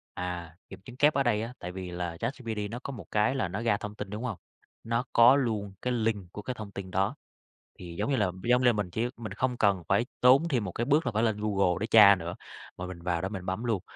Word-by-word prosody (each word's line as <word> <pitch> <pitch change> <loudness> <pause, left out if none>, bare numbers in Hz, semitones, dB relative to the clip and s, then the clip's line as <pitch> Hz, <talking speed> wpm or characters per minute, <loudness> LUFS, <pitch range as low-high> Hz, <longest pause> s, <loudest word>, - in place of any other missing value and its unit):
À, 90 -2 -5
kiểm 95 - -10
chứng 125 - -11
kép 150 +3 +5
ở 140 - +2
đây 115 -4 +1
á, 115 +2 -5
tại 90 - -6
vì 90 -1 -6
là 85 -1 -4
ChatGPT 115 -3 -4
nó 120 - -5
có - - -5
một 110 -10 -9
cái 105 +5 +2
là 130 - 0
nó 95 +5 -4
ra 115 -3 +2
thông 105 0 -7
tin, 105 -1 -6
đúng 105 +4 -5
không? 115 -7 -3 0.5
Nó 115 +2 0
có 120 +3 +7
luôn 110 -7 -1
cái 125 - -1
link 110 -6 -1
của 105 - -7
cái 130 - -4
thông 110 -4 -8
tin 95 -1 -7
đó, 95 +2 0 0.6
thì 85 -2 -8
giống - - 0
như - - +3
là 105 -6 +1
giống 125 +1 +3
lê 120 - +6
mình 105 -4 -2
chỉ 110 +7 -1
mình 110 -4 -7
không 125 +3 -1
cần 100 -5 +2
phải 105 +5 +3 0.2
tốn 130 +6 +6
thêm 125 -7 +1
một 95 - -4
cái 120 - -2
bước 145 +3 +3
là 125 - 0
phải 110 +1 0
lên 110 -3 +1
Google 100 -4 +1
để 110 - -2
tra 105 -3 +8
nữa, 85 -1 -6 0.4
mà 90 - -5
mình 90 -2 -8
vào 85 -1 -1
đó 95 - -2
mình 95 -3 -6
bấm 95 +5 -3
luôn. 115 -6 0
105 Hz, 270 wpm, -28 LUFS, 95-120 Hz, 0.6 s, tra